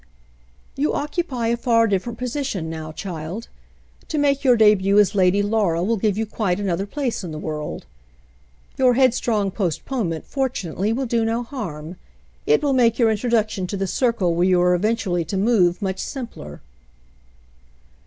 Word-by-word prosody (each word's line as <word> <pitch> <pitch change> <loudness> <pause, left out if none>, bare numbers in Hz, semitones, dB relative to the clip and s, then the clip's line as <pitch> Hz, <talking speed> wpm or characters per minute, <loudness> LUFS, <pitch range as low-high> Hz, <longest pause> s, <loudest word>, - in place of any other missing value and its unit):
"You 290 +3 0
occupy 285 -6 -2
a 235 - +2
far 230 -1 +3
different 220 +3 -1
position 250 - -3
now, 160 -1 -6
child. 170 +5 -6 0.6
To 310 - -3
make 280 -1 +2
your 250 -3 +5
debut 205 -2 +4
as 205 -1 +4
Lady 195 0 +3
Laura 200 -6 +1
will 225 +5 +1
give 210 -1 0
you 220 - 0
quite 205 -3 -1
an 200 -1 -2
other 185 +3 -1
place 260 -3 -3
in 175 - -6
the 155 - -6
world. 155 -1 -5 0.9
Your 255 -2 +4
headstrong 235 -6 +2
postpone 200 - -2
ment, 160 -1 -5
fortunately, 215 - -2
will 260 +4 -1
do 230 -1 0
no 225 +2 -1
harm. 175 - -7 0.5
It 445 -6 +3
will 285 -2 +2
make 235 -3 +3
your 230 -3 +4
introduction 215 -3 0
to 200 - -4
the 195 - -1
circle 200 -4 +1
where 175 +2 +2
you 180 -1 +4
are 180 0 +4
eventually 185 -2 0
to 190 +5 -3
move, 195 -3 +2
much 190 -1 -2
simpler." 230 - -7
210 Hz, 165 wpm, -22 LUFS, 180-240 Hz, 0.9 s, your